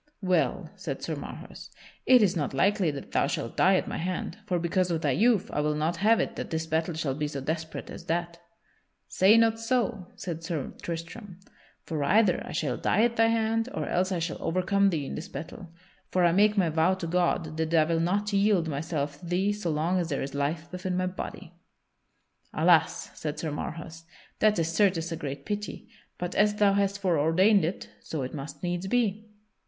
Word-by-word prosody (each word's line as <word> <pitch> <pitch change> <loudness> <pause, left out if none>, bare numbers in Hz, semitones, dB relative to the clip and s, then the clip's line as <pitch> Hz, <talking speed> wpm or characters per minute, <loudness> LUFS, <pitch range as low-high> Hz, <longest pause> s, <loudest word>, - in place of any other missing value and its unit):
"Well," 185 -1 +1
said - - -5
Sir - - -2
Marhaus, - - -9 0.4
"it 250 -3 +7
is 190 -2 +2
not 145 -4 -2
likely 195 +3 +2
that 140 -2 -6
thou - - +2
shalt - - -3
die 190 +1 +5
at - - 0
my - - -4
hand. 185 +5 -3
For 180 -3 +1
because 180 +2 0
of 165 -2 -1
thy - - +2
youth 225 -3 +3
I 150 - +1
will 150 0 0
not 160 +3 -1
have 220 +5 +4
it - - -1
that - - -4
this 160 0 -2
battle 160 +1 -1
shall 155 -4 -1
be 150 +2 -2
so 145 -1 -5
desperate 160 +4 -4
as - - -9
that." 170 0 -2 0.7
"Say 195 - +5
not 225 0 +3
so," 225 -5 -1
said 165 -2 -6
Sir 165 -5 -3
Tristram, 175 +3 -7 0.5
"for 155 -3 -2
either 190 +3 +3
I - - -8
shall - - -1
die 215 - +2
at 235 0 +2
thy 225 0 +4
hand, 225 +1 +1
or - - -2
else 185 +2 0
I 185 - 0
shall 165 0 -3
overcome 195 +3 +2
thee 155 -6 -2
in - - -5
this - - -6
battle, 165 +5 -8 0.4
for 180 -1 +2
I 170 - +5
make 205 +4 +4
my 180 -4 +3
vow 160 +4 +2
to 185 - -5
God 170 -2 0
that 160 0 -1
I 165 -2 +5
will 165 +1 0
not 200 +5 0
yield 200 -4 +3
myself 145 -1 -3
to 175 - -10
thee 190 +4 +1
so 205 -4 -3
long 165 +4 +1
as 170 -2 -2
there 140 - -1
is 135 - -6
life 150 +4 -2
within 180 0 -3
my 185 - +1
body." 180 -2 -6 1.0
"Alas!" 165 +1 +3
said 150 -1 -5
Sir 160 - -3
Marhaus, 165 +2 -6 0.3
"that 215 -1 +4
is 165 0 0
certes 170 -3 +2
a - - -1
great 140 -3 -6
pity. 210 +2 -5 0.3
But 175 0 -4
as 210 0 +3
thou 205 -1 +4
hast 200 0 +1
foreordained 185 +2 +3
it, 170 +4 -3
so 155 -4 -4
it 130 - -5
must 145 +3 -7
needs 175 +1 -2
be." 220 -1 0
175 Hz, 205 wpm, -28 LUFS, 160-200 Hz, 1.0 s, it